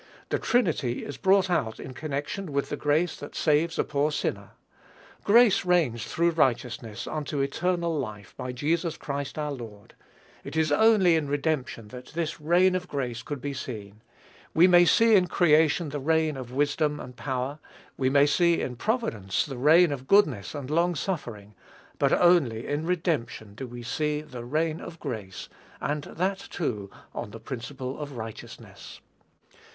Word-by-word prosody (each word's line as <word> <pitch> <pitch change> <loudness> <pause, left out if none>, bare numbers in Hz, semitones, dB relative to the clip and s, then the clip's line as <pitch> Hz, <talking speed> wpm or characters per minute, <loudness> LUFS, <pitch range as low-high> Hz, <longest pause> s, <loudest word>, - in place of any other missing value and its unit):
The - - 0
Trinity 155 - 0
is 145 - -7
brought 190 0 +4
out 110 -12 -1
in 130 - -8
connection 150 +6 -4
with 140 0 -1
the - - -2
grace 150 +4 +1
that 145 - -9
saves 160 +1 +2
a - - +2
poor 150 +1 0
sinner. - - -3 0.7
"Grace 225 -1 +5
reigns 160 - +1
through 170 +1 +1
righteousness, 120 -7 -1
unto 150 -1 -3
eternal 170 +4 0
life, 105 -6 -6
by 125 - -5
Jesus 160 +6 -1
Christ 140 0 -5
our 150 -1 -2
Lord." 115 -6 -9 0.5
It 140 - -8
is 155 -2 +2
only 195 0 +5
in 155 -3 0
redemption 140 -6 -2
that 125 +1 -10
this 165 -2 -3
reign 175 +4 +4
of 180 -1 -2
grace 125 -6 -3
could 145 -3 -6
be 145 +1 -3
seen. 110 -6 -7 0.5
We 165 - +7
may 175 -1 +7
see 225 +5 +5
in 185 -2 +4
creation 160 -1 +3
the 145 +1 -4
reign 160 +1 +1
of 130 -2 -7
wisdom 145 +2 0
and 125 - -9
power; 130 +3 -3 0.4
we 130 -1 +1
may 140 +1 +5
see 170 +3 +3
in 125 -2 -4
providence 120 - -1
the 135 - -6
reign 160 +5 +6
of 135 -2 -5
goodness 155 - +3
and 140 -1 -6
long 170 +2 +2
suffering; 120 - -4 0.5
but - - +3
only 150 -11 +3
in 150 +3 -2
redemption 150 - -2
do 130 +5 -7
we 120 0 -9
see 150 +4 -1
the 125 -6 -9
reign 155 +4 -1
of 165 - -9
grace, 110 -9 -6 0.3
and 145 0 -2
that, 190 +3 -2
too, 105 - -4 0.2
on - - -5
the 115 +2 -10
principle 130 +3 -6
of 145 -2 -6
righteousness. 110 -1 -9
145 Hz, 165 wpm, -27 LUFS, 125-170 Hz, 0.7 s, We